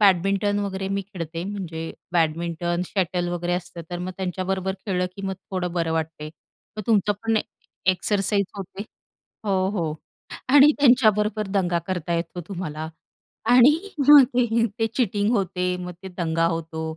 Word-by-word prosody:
Badminton 195 +1 +3
वगैरे 195 -1 -3
मी 195 0 -1
खेळते, 170 -4 -6
म्हणजे 175 -5 -5 0.2
बॅडमिंटन, 170 +1 0
शटल 180 -2 -1
वगैरे 175 0 -2
असतं, 175 -1 -4
तर 175 - -3
मग 180 +1 -4
त्यांच्याबरोबर 190 0 -2
खेळलं 180 -2 0
की 200 - -7
मग 190 - -2 0.2
थोडं 180 -2 -2
बरं 165 -2 0
वाटते. 160 -1 -3 0.5
मग 215 - -4
तुमचं 210 -2 +3
पण 225 -1 +1
एक - - 0 0.4
एक्सरसाइज 200 +2 +1
होते 195 +1 -6 0.6
हो, 190 -2 +1
हो. 170 -7 -2 0.6
आणि 290 +2 +8
त्यांच्याबरोबर 215 -5 +4
दंगा 185 -3 +1
करता 175 -2 -2
येतो 170 +1 -3
तुम्हाला. 160 -5 -5 0.6
आणि 245 +3 +8 0.4
मग 290 -2 +10
ते 235 -2 +3
ते 225 - +3
चीटिंग 205 -4 +1
होते, 180 -2 0
मग 180 0 -6
तो - - -5
दंगा 165 -1 +1
होतो. 165 -1 -3
185 Hz, 150 wpm, -24 LUFS, 170-205 Hz, 0.6 s, मग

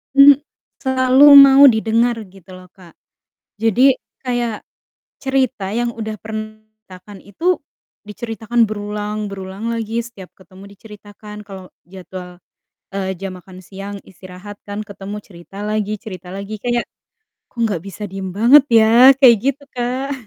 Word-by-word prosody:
hmm, 275 0 +8 0.4
selalu 260 +1 +3
mau 275 0 +9
didengar 230 0 +2
gitu 190 -1 -19
loh, 185 0 -14
Kak. 180 -3 -18 0.6
Jadi 235 +5 +3 0.2
kayak 240 -4 -3 0.6
cerita 260 -6 -1
yang 240 +1 -1
udah 220 -1 -6
pernah 215 0 -7 0.3
diceritakan 185 +2 -13
itu 205 - -8 0.6
diceritakan 225 +2 -4
berulang 210 0 -5
berulang 195 +3 -6
lagi, 230 0 -3
setiap 205 -6 -13
ketemu 190 +1 -16
diceritakan, 210 0 -13
kalau 190 -2 -10 0.2
jadwal, 180 -1 -11 0.5
eee, 190 -1 -4
jam 195 +1 -7
makan 185 +1 -15
siang 200 +2 -8
istirahat 185 +2 -12
kan 205 +1 -5
ketemu, 200 0 -9
cerita 175 0 -16
lagi 215 0 -2
cerita 185 -5 -10
lagi, 200 +2 -7
kayak, 240 -1 -1 0.7
"Kok - - -21
enggak 205 -7 -2
bisa 200 +2 -9
diem 190 0 -7
banget 235 +10 +5
ya?" 230 +3 +6
Kayak 250 -4 +7
gitu, 275 +2 -2
Kak. 255 +3 -3
215 Hz, 135 wpm, -18 LUFS, 195-240 Hz, 0.7 s, mau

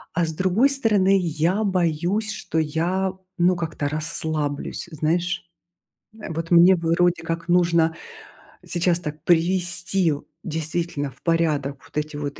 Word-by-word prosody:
А 170 0 +2
с 160 - -4
другой 190 - +3
стороны, 210 -8 +3
я 175 +4 0
боюсь, 185 +3 0
что 185 -5 -5
я, 170 +5 0 0.2
ну, 180 +1 +3
как-то 160 -4 -3
расслаблюсь. 155 0 -3
Знаешь. 170 +4 -1 0.8
Э, 215 - -7
вот 165 +1 -4
мне 175 +2 +7
бы, 165 -1 -2
вроде 175 0 +2
как, 165 +1 -4
нужно 170 -2 +3 0.7
сейчас 175 0 +1
так 150 -2 -7
привести 180 0 +1
в 145 - -4 0.2
действительно, 160 -2 -3
в 125 - -24
порядок 150 -5 0
вот - - -11
эти 150 0 -2
вот 145 -1 -5
170 Hz, 140 wpm, -23 LUFS, 155-180 Hz, 0.8 s, мне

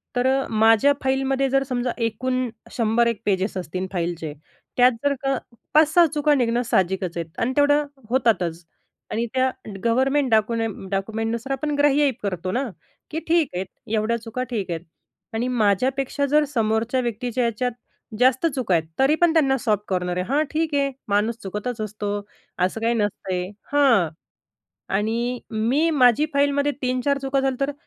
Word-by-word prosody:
तर 245 +1 +2
अ, 270 +1 +1
माझ्या 225 +5 +5
फाईलमध्ये 270 0 +1
जर 270 +1 +2
समजा 250 -2 -2
एकूण 255 +2 -1 0.2
100 230 0 +2
एक 230 -2 -2
पेजेस 195 0 0
असतील 185 +2 -4
फाईलचे 170 -3 -3 0.4
त्यात 250 0 +6
जर 285 - +3
का 270 -1 +1 0.4
5-6 315 +3 +6
चुका 295 0 +3
निघणं 240 -2 +1
साहजिकच 185 -3 0
आहेत 165 -1 -6
आणि 245 - +1
तेवढं 290 +1 +4 0.2
होतातच 185 -10 +1 0.5
आणि 230 +2 0
त्या 260 0 +2 0.3
गव्हर्नमेंट 265 +4 +2
डाकूनेम 220 -2 0
डाक्युमेंटनुसार 225 +5 -2
आपण 295 +2 -2
ग्राह्य 290 0 +4
ही 280 - +3
करतो 185 -2 -2
ना 255 +6 0 0.5
की 315 - -2
ठीक 325 -3 +3
आहे, 185 +2 -2 0.3
एवढ्या 220 +2 +1
चुका 230 +3 -4
ठीक 205 -6 -2
आहेत 165 -1 -3 0.5
आणि 230 +3 -1
माझ्यापेक्षा 255 +5 +1
जर 300 +2 +3
समोरच्या 225 +2 +1
व्यक्तीच्या 245 +1 -2
याच्यात 235 +2 -1 0.5
जास्त 260 +4 +4
चुका 245 -8 0
आहेत, 165 - +1 0.2
तरी 270 +3 +4
पण 345 -2 +5
त्यांना 275 -5 +3
सॉफ्ट 215 -5 0
कॉर्नर 180 -1 -1
आहे. 180 - -1
"हां, 295 +3 +3
ठीक 315 -1 0
आहे 280 -1 +1 0.2
माणूस 210 +3 +1
चुकतच 210 +4 -4
असतो, 205 -1 -3 0.4
असं 185 +5 0
काही 230 +1 +2
नसतंय" 190 -4 -2 0.2
हां, 240 - +4 0.9
आणि 230 +4 -1
मी 240 +9 +1
माझी 265 0 +4
फाईलमध्ये 285 0 +2
3-4 255 +2 +1
चुका 270 0 0
झाल्या 270 0 0
तर 290 - -3
240 Hz, 155 wpm, -23 LUFS, 210-270 Hz, 0.9 s, त्यात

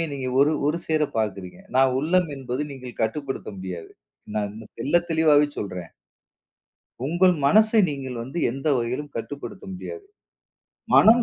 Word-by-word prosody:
இரண்டையுமே - - +2
நீங்க 135 -2 -4
ஒரு 145 +2 +5
ஒரு 155 +3 +1
சேர 155 -1 +2
பாக்குறீங்க. 100 - -2 0.2
நான் 130 -1 +5
உள்ளம் 175 +3 +2
என்பது 130 +1 -3
நீங்க 125 -2 -8
கட்டுப்படுத்த 135 +4 -2
முடியாது. 90 -3 -6 0.4
நான் 105 -1 -1 0.3
தெள்ள 140 +7 -2 0.2
தெளிவாவே 155 -2 +5
சொல்றேன். 90 -4 -5 1.2
உங்கள் 180 +3 +4
மனசை 215 +5 +5
நீங்க 135 -3 -4
வந்து 135 +8 -5
எந்த 135 +5 -3
வகையிலும் 125 +5 -3
கட்டுப்படுத்த 145 +9 -6
முடியாது. 410 - -7 0.9
மனம் 235 +2 +7
140 Hz, 135 wpm, -24 LUFS, 115-160 Hz, 1.2 s, மனம்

